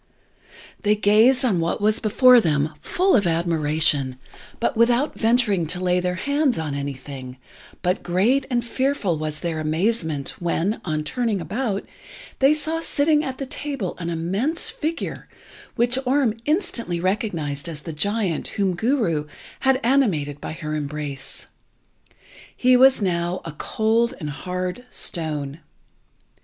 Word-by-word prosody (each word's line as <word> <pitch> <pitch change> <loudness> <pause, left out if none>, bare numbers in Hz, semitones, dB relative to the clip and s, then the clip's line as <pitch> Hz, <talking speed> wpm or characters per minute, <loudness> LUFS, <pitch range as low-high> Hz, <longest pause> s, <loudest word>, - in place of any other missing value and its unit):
They 210 0 +3
gazed 220 +6 +4
on 200 -8 +2
what 165 +1 -1
was 215 +1 +2
before 250 +2 +6
them 155 -3 0
full 375 +2 +2
of 200 -6 +3
admiration, 155 -5 +2 0.4
but 240 - 0
without 240 +5 +3
venturing 220 -7 +2
to 180 +3 -2
lay 180 0 +2
their 180 0 -1
hands 285 +5 +1
on 155 -3 -3
anything; 135 -2 -6 0.5
but 180 +1 +1
great 210 +10 +1
and 240 -2 0
fearful 240 - 0
was 155 -1 -4
their 165 -2 -2
amazement 160 -2 0
when, 175 +5 -1
on 155 -3 -2
turning 225 +4 -1
about, 210 +2 -2 0.5
they 270 +1 +5
saw 315 +2 -2
sitting 305 -1 +2
at 265 -3 -4
the 275 - -4
table 275 -7 -4
an 170 -1 -3
immense 200 - -1
figure, 330 -8 -4 0.5
which 245 +2 +2
Orm 260 -3 +2
instantly 235 - 0
recognised 170 - -2
as 155 -3 -6
the 165 - -7
giant 200 0 -1
whom 195 -3 0
Guru 205 - 0 0.3
had 265 -1 +3
animated 180 - +1
by - - -5
her 155 -2 -5
embrace. 145 -2 -5 1.1
He 255 0 +5
was 260 -3 +5
now 175 0 0
a 165 - -5
cold 220 +9 0
and 150 -4 -4
hard 180 +7 -4
stone. 150 -3 -3
190 Hz, 140 wpm, -23 LUFS, 160-250 Hz, 1.1 s, before